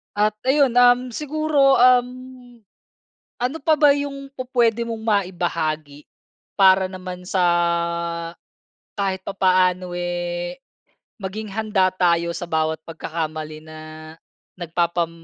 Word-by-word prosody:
At 210 0 +1
ayun. 265 -2 +3
Uhm, 245 0 +6
siguro, 300 -3 +2
uhm, 250 0 +1 0.8
ano 250 +6 -1
pa 315 - +4
ba 295 -2 +7
yung 275 -1 -5
pu-puwede 240 -3 +1
mong 225 -1 -5
maibahagi? 170 -8 -2 0.6
Para 190 0 +6
naman 185 -1 -8
sa 190 0 0 1.6
kahit 190 -2 -1
papaano 185 -2 +1
eh, 175 0 -3 0.6
maging 205 +2 -6
handa 205 -3 +1
tayo 170 -2 +2
sa 175 - -5
bawat 160 -1 -1
pagkakamali 155 -1 -5
na, 155 0 -11 0.8
nagpapam 170 0 -1
190 Hz, 100 wpm, -22 LUFS, 175-245 Hz, 1.6 s, ba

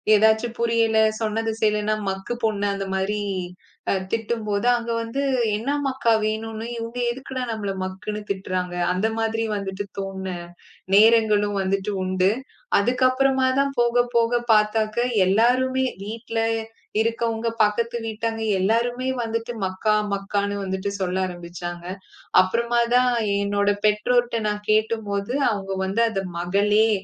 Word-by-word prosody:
ஏதாச்சு 220 +2 +4
புரியல. 230 -1 +2 0.2
சொன்னது 225 0 -1
செய்யலன்னா, 210 0 +1
மக்கு 195 +5 -3
பொண்ணு 205 -2 +1
அந்த 195 0 -3
மாரி 205 +2 -1 0.7
அ - - +3 0.2
திட்டும்போது 225 -1 -1
அங்க 235 -1 -3
வந்து 230 +5 -3 0.3
என்ன 230 +6 -3 0.2
மக்கா 260 -4 +2
வேணுன்னு 220 +1 -3
இவங்க 230 +1 -6
எதுக்குடா 260 0 -5
நம்மள 205 -3 -3
மக்குன்னு 200 +3 -5
திட்டுறாங்க. 185 -2 -2 0.2
அந்த 195 +5 +1
மாதிரி 225 0 0
வந்துட்டு 195 0 -4 0.2
தோன்ன 190 -1 -4 0.6
நேரங்களும் 210 -1 +5
வந்துட்டு 195 +2 -1
உண்டு. 185 0 +2 0.5
அதுக்கு 245 +5 +1
அப்புறமா 265 0 +2
தான் 275 0 +2
போக 240 0 +3
போக 235 +1 +3
பாத்தாக்க 215 +1 +2 0.3
எல்லாருமே 255 +5 +3 0.2
வீட்ல 225 +2 -4 0.6
இருக்கவங்க 230 0 -1 0.2
பக்கத்து 230 +3 0
வீட்டாங்க 225 +1 -3 0.2
எல்லோருமே 240 +6 +1
வந்துட்டு 230 +1 -3
மக்கா, 200 +3 +1 0.2
மக்கான்னு 200 +1 -1
வந்துட்டு 190 +1 -2
சொல்ல 185 0 -1
ஆரம்பிச்சாங்க. 175 0 -7 0.6
அப்புறமா 235 +5 +1
தான் 250 0 +4 0.3
என்னோட 205 0 +1 0.2
பெற்றோர்ட்ட 235 +3 +2
நான் 210 0 -4
கேட்டும்போது 215 0 0 0.2
அவங்க 195 -2 -4
வந்து 200 +5 0
அத 195 -3 -2 0.2
மகளே, 205 +5 +3
215 Hz, 120 wpm, -23 LUFS, 200-230 Hz, 0.7 s, நேரங்களும்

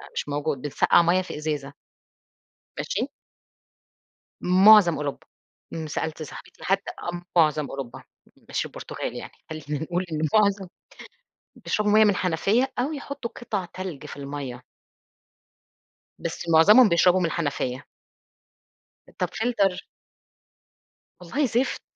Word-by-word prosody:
مش - - -3
موجود 145 -2 -2
بنسقَّع 145 +4 +3
مَيّة 175 +2 +3
في 185 - -7
إزازة. 150 -2 -3 1.0
ماشي؟ - - -2 1.3
مُعظم 185 -1 +7
أوروبا، 145 -1 -5 0.6
سألت 155 +1 -4
صاحبتي 150 - -12
حتى 195 +1 0 0.5
مُعظم 155 -2 +3
أوروبا، 135 -3 -7 0.5
مش - - -1
البرتغال - - -6
يعني، - - -7 0.2
خلّينا 150 -1 -4
نقول 175 +3 -2
إن 155 - -2 0.2
مُعظم 200 -3 +3 0.9
بيشربوا 210 -1 -1
مَيّة 215 +1 +7
من 210 - +5
الحنفية 200 - +1
أو 265 +5 0
يحطّوا 280 -4 -6
قِطَع 210 -6 -4
تلج 175 -5 -7
في - - -9
المَيّة. 140 -3 -6 1.6
بس 170 - -5
مُعظمهم 210 +9 +7
بيشربوا 180 +2 +4
من 180 - +1
الحنفية. 145 -5 -2 1.3
طَب - - 0
فلتر. 210 -5 0 1.4
والله 260 - -1
زِفت، 250 +1 0
175 Hz, 110 wpm, -25 LUFS, 150-210 Hz, 1.6 s, مُعظم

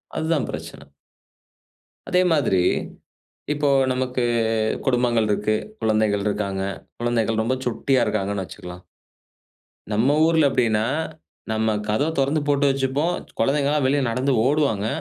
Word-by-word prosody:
அதுதான் 160 -3 0
பிரச்சன. 70 0 -8 1.2
அதே 180 0 +3
மாதிரி 130 - +2 0.9
இப்போ 145 -1 0 0.2
நமக்கு, 125 0 -1 0.6
குடும்பங்கள் 120 -4 +2
இருக்கு, 105 +1 +1 0.3
குழந்தைகள் 110 -2 +1
இருக்காங்க, 100 -2 -2 0.4
குழந்தைகள் 115 -2 0
ரொம்ப 125 +3 0
சுட்டியா 125 +2 +1
இருக்காங்கன்னு 100 -2 -1
வச்சுக்கலாம். 90 0 -10 1.1
நம்ம 120 +8 +2
ஊர்ல 160 -1 +4
எப்டினா, 110 -4 +1 0.7
நம்ம 110 0 +1
கதவ 110 +8 +1
திறந்து 140 +3 +2
போட்டு 145 0 +2
வைச்சுப்போம். 135 +5 0 0.3
குழந்தைகள்லாம் 140 +3 +1
வெளிய 140 +2 +2
நடந்து, 130 +4 0
ஓடுவாங்க. 135 -8 +1
125 Hz, 110 wpm, -22 LUFS, 110-140 Hz, 1.2 s, ஊர்ல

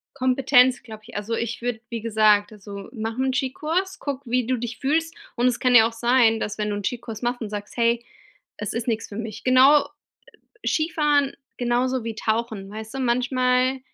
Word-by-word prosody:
Kompetenz, 260 -1 +3
glaube 220 -3 -11
ich. 240 - -10
Also, 210 +3 -3
ich 235 +1 -3
würde, 245 -2 -2
wie 230 -1 -4
gesagt 215 -2 +3
also, 200 -1 -9
mach 225 -2 -4
'n 260 0 +1
Ski-Kurs, 315 +8 -2
guck, 280 -1 -4
wie 245 0 0
du 255 0 +1
dich 240 0 -5
fühlst 325 +4 0 0.2
und 240 +1 +2
es 245 - +1
kann 250 -1 +3
ja 225 -2 +8
auch - - -11
sein, 230 -1 +3
dass 210 +1 -4
wenn 210 0 -1
du - - -1
einen 205 -1 -5
Ski-Kurs 230 -1 -4
machst 245 +1 -1
und 220 -3 -5
sagst: 205 0 -7
„Hey, 235 0 +2 0.5
es 210 - -4
ist 235 +1 -4
nix 225 -1 -1
für 200 - -9
mich.“ 220 -2 -6
Genau 265 +3 +6 0.8
Skifahren 295 -3 +1 0.2
genauso 250 +1 0
wie 225 -1 -4
tauchen, 220 -2 -2
weißt 220 +2 -8
du? - - -3
Manchmal, 255 +1 +1
240 Hz, 195 wpm, -23 LUFS, 220-260 Hz, 0.8 s, ja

